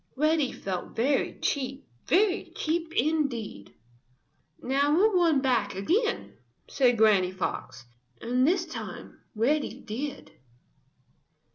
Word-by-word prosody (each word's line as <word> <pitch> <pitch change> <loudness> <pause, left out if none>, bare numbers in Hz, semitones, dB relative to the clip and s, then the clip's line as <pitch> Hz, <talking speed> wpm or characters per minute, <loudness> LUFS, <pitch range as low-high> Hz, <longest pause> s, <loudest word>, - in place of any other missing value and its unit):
Reddy 305 -1 +2
felt 185 -2 -5
very 270 +5 +1
cheap, 270 -1 -2 0.2
very 385 +2 +2
cheap 325 +1 -2
indeed. 250 - -1 0.8
"Now 280 +3 +1
we'll 420 +5 +4
run 335 -6 +3
back 240 -8 +1
again," 415 - -1 0.3
said 245 -3 +2
Granny 210 -4 +4
Fox. 130 -9 -5 0.3
And 250 +3 +1
this 355 +1 +2
time 320 - -8 0.2
Reddy 280 +7 0
did. 275 +6 -6
275 Hz, 105 wpm, -27 LUFS, 230-320 Hz, 0.8 s, we'll